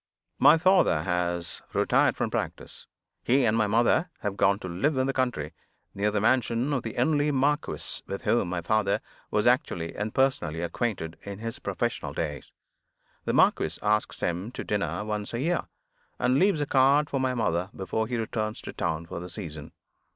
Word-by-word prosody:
My 145 +4 +7
father 180 - +4
has 85 -1 -2
retired - - +3
from - - -1
practice. - - -5 0.4
He 130 +1 +3
and 110 -1 +3
my 110 -2 +2
mother 120 - +3
have 100 -2 -2
gone 100 0 +3
to 95 - -7
live 130 - 0
in 130 - +2
the 135 - 0
country, 120 - -1 0.4
near 100 +1 0
the 105 0 0
mansion 120 +4 +2
of 135 - 0
the 115 - -6
only 150 -2 +2
marquis 145 +2 0
with 100 - -5
whom 105 -4 +2
my 90 -1 -2
father 100 +2 +1 0.3
was - - +1
actually 85 -1 +1
and 105 +1 -3
personally 130 - +1
acquainted 85 -3 -3
in 100 -1 -7
his 115 +2 -5
professional - - -2
days. 75 -3 -4 0.7
The - - 0
marquis - - +3
asks 105 +1 0
him 90 +5 -1
to - - -5
dinner 105 0 -2
once 105 +1 -3
a - - -2
year, 170 +6 0 0.5
and 130 +2 +2
leaves 190 -5 +3
a - - +1
card 140 +2 +4
for 135 - -2
my 130 -1 0
mother 90 -5 0
before 110 +3 -2
he 120 0 -2
returns 110 -1 -2
to - - -7
town 80 -1 -2
for 85 - -6
the 90 +1 -7
season. 80 -8 -7
110 Hz, 180 wpm, -27 LUFS, 90-130 Hz, 0.7 s, My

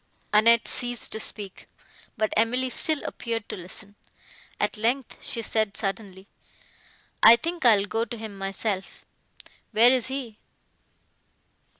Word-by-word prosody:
Annette 230 +2 +5
ceased 245 -1 0
to 220 - -3
speak, 205 -3 -5 0.5
but 215 -1 0
Emily 250 +3 +1
still 310 +4 +2
appeared 230 -3 -4
to - - -4
listen. 190 +3 -7 0.7
At - - 0
length 235 +4 -1
she 230 - -4
said, 215 -2 -1
suddenly, 195 -2 -5 0.9
"I 225 +2 +10
think 335 +4 -4
I 225 -3 +7
will 200 - -1
go 225 +3 -1
to 235 0 -8
him 215 -2 -7
myself;—where 195 +3 -2
is 255 -3 +1
he?" 260 -5 -6
225 Hz, 125 wpm, -25 LUFS, 205-240 Hz, 0.9 s, I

